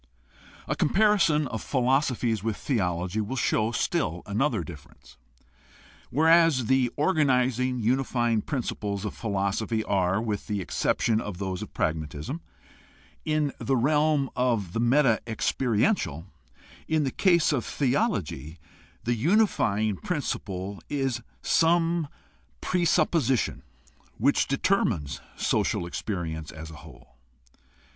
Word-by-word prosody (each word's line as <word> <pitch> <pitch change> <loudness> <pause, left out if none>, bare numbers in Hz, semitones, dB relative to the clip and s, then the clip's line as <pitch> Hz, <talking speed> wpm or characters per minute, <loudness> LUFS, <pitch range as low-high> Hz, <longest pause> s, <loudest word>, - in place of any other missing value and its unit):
A - - -1
comparison 190 -6 +3
of 110 - -4
philosophies 125 -4 +1
with 110 -2 -2
theology 90 - -1
will 110 +5 -4
show 110 -2 +1
still 90 -6 -1
another 110 - 0
difference. 75 -6 -13 0.9
Whereas 160 -3 +4
the 130 +1 +3
organizing, 130 -6 +2
unifying 120 -1 +1
prin 135 -1 -3
ciples 100 -2 -4
of 105 - -3
philosophy 105 +1 -1
are, 95 -1 +1
with 110 -3 -3
the 105 -2 -1
exception 110 +4 0
of 105 -5 -6
those 95 0 -3
of 105 - -8
prag 90 -6 +1
matism, 75 - -6 0.9
in 155 -2 0
the 135 - 0
realm 150 +1 +2
of 115 -8 0
the - - -1
meta 120 -1 +3
experiential, 110 - 0 0.6
in 160 -1 +1
the 135 - -1
case 170 -1 +3
of 130 -6 0
theology 95 - -1 0.5
the 120 - +1
unifying 115 - +2
principle 100 - -4
is 135 -4 -1 0.2
some 165 -1 +2 0.5
presupposition 160 - +1 0.6
which 140 +6 +2
determines 95 - 0
social - - 0
experience 85 -4 -4
as 80 +1 -9
a 75 - -11
whole. 75 -4 -16
120 Hz, 115 wpm, -27 LUFS, 100-145 Hz, 0.9 s, Whereas